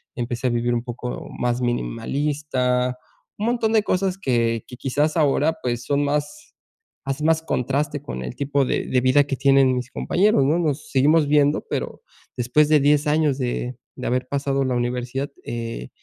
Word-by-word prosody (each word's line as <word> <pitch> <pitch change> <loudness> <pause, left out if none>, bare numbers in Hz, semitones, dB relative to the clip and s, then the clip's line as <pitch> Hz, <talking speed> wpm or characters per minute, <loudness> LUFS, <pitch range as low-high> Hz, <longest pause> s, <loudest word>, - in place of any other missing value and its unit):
empecé 120 +1 -2
a - - +2
vivir 120 0 0
un 120 0 -1
poco 125 0 -6
más 125 0 0
minimalista, 125 +1 -1 0.4
un 210 - -2
montón 230 -2 +1
de 215 -2 +4
cosas 190 -1 0
que 115 - 0
que 125 - -9
quizás 145 +4 0
ahora, 150 +1 +2
pues, 120 -1 -2
son 145 0 +1
más 150 - -3 0.5
hacen 135 +3 -2
más 160 0 +3
contraste 145 0 -1
con 65 - -6
el 60 - -6
tipo 140 -1 0
de - - -1
de 125 -1 +2
vida 130 +3 +4
que 140 -1 -2
tienen 135 -2 +4
mis 125 0 -4
compañeros, 195 -6 +2
¿no?, 160 +5 +2
nos 150 -3 -2
seguimos 145 +3 +4
viendo, 145 0 +3
pero - - -4 0.4
después 125 +5 +3
de 155 -1 +5
10 145 +2 +3
años 150 -2 +2
de 125 -1 -3 0.2
de 125 - -5
haber 125 +1 0
pasado 140 0 0
la 125 -1 0
universidad, 125 +3 -2
eh, 115 - -5
135 Hz, 175 wpm, -22 LUFS, 125-150 Hz, 0.5 s, de